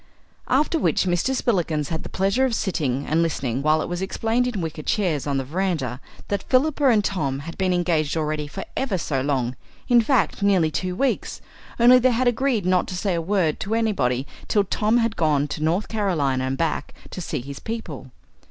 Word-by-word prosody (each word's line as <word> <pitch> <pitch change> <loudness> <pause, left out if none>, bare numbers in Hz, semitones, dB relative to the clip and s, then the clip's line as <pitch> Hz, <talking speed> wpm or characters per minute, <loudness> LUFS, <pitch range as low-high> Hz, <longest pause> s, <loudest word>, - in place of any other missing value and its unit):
After 300 +5 +2
which - - +2
Mr. 185 +8 0
Spillikins 170 - 0
had 160 -1 -3
the - - -8
pleasure 195 +7 +1
of 255 -3 +1
sitting 145 - -1
and 160 +2 +1
listening 135 -6 -1
while 155 +2 +2
it - - -5
was 175 +1 -4
explained 225 +5 0
in 235 -5 -3
wicker 160 -2 -4
chairs 160 -5 0
on 140 -1 0
the 135 - -1
verandah, 150 -5 -2 0.3
that 200 - -1
Philippa 285 +2 +3
and 215 -4 +4
Tom 140 -8 -1
had 165 +3 -8
been 190 -1 0
engaged 170 -4 +1
already 155 -1 -2
for 195 +6 -6
ever 250 -8 -1
so 140 -5 -1
long 130 -3 -1 0.3
in 240 -2 +5
fact, 245 -2 +1
nearly 190 -6 +3
two 180 +2 -2
weeks, 270 +6 -1 0.4
only 245 +2 +7
they 255 +1 +4
had 250 +2 +1
agreed 245 -4 +1
not 185 -1 +2
to 185 - -5
say 195 0 0
a 170 - 0
word 175 -3 0
to 215 +3 -2
anybody 140 - 0 0.2
till 205 - +3
Tom 210 +4 +1
had 230 -2 +1
gone 150 -3 +1
to 150 - -5
North 170 +6 +1
Carolina 155 -12 0
and 130 +1 -2
back, 165 -2 -2 0.2
to 185 - -6
see - - -3
his 140 +2 -8
people. 220 - -6
180 Hz, 200 wpm, -23 LUFS, 150-220 Hz, 0.4 s, only